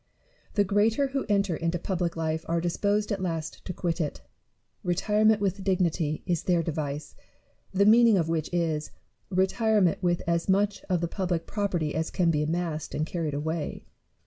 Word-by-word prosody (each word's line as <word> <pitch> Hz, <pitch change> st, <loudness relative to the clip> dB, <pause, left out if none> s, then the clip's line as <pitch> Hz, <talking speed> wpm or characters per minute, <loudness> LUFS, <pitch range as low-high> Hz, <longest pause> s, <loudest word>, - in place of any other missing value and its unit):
The 205 Hz, -, +4 dB
greater 215 Hz, +7 st, +2 dB
who 270 Hz, 0 st, -2 dB
enter 200 Hz, -4 st, +2 dB
into 165 Hz, +2 st, -1 dB
public 175 Hz, -1 st, -2 dB
life 160 Hz, 0 st, -1 dB
are 170 Hz, 0 st, +1 dB
disposed 205 Hz, +5 st, 0 dB
at 195 Hz, -2 st, -1 dB
last 165 Hz, -3 st, -3 dB
to -, -, -3 dB
quit 175 Hz, -1 st, -2 dB
it: 150 Hz, -, -3 dB, 0.6 s
retirement 210 Hz, +4 st, +3 dB
with 195 Hz, -1 st, -1 dB
dignity 170 Hz, -5 st, 0 dB
is 170 Hz, -3 st, 0 dB
their 175 Hz, -2 st, +1 dB
device; 150 Hz, -2 st, -4 dB, 0.6 s
the 200 Hz, +1 st, +3 dB
mean 235 Hz, +3 st, +7 dB
ing 215 Hz, -3 st, +5 dB
of 165 Hz, -3 st, +1 dB
which 165 Hz, -2 st, -1 dB
is, 160 Hz, -3 st, -1 dB, 0.4 s
retirement 190 Hz, 0 st, +2 dB
with 175 Hz, -1 st, +1 dB
as 170 Hz, +2 st, 0 dB
much 200 Hz, +1 st, +2 dB
of 180 Hz, -3 st, 0 dB
the 170 Hz, -, 0 dB
public 175 Hz, -2 st, -2 dB
property 180 Hz, -7 st, -1 dB
as 160 Hz, +1 st, -1 dB
can 175 Hz, -3 st, +2 dB
be 150 Hz, -2 st, +1 dB
amassed 160 Hz, 0 st, -2 dB
and 155 Hz, -, 0 dB
carried 160 Hz, -3 st, -3 dB
away. 160 Hz, +1 st, -3 dB
175 Hz, 170 wpm, -27 LUFS, 165-200 Hz, 0.6 s, mean